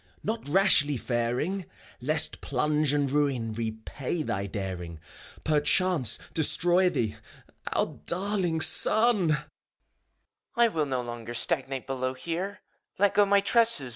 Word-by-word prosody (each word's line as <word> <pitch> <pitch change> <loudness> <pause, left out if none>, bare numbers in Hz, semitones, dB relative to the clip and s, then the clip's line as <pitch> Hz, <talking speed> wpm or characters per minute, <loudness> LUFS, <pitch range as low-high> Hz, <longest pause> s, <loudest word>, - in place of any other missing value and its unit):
Not 220 -7 -4
rashly 150 -5 +3
faring; 125 - -2 0.3
Lest 155 +5 0
plunge 150 +2 0
and 145 -2 0
ruin 135 -6 0
Repay 115 +8 -4
thy 100 -6 -3
daring, 90 -5 -6 0.4
Perchance 155 - +3 0.2
destroy 175 +3 +4
thee. 120 -11 -2 0.6
Our - - +1 0.2
daiiing 180 -3 0
son 215 -8 +4
I - - +3
BUPHOEION. - - -11 1.1
I 235 0 +5
will 155 -7 -1
not 130 -2 -3
longer 120 0 -7
Stagnate 135 +2 -2
below 130 -1 -3
here 175 +8 -5 0.4
I 200 - -1
Let 200 - +4
go 205 -1 +4
my 200 0 +4
tresses. 225 - +2
150 Hz, 130 wpm, -27 LUFS, 125-185 Hz, 1.1 s, I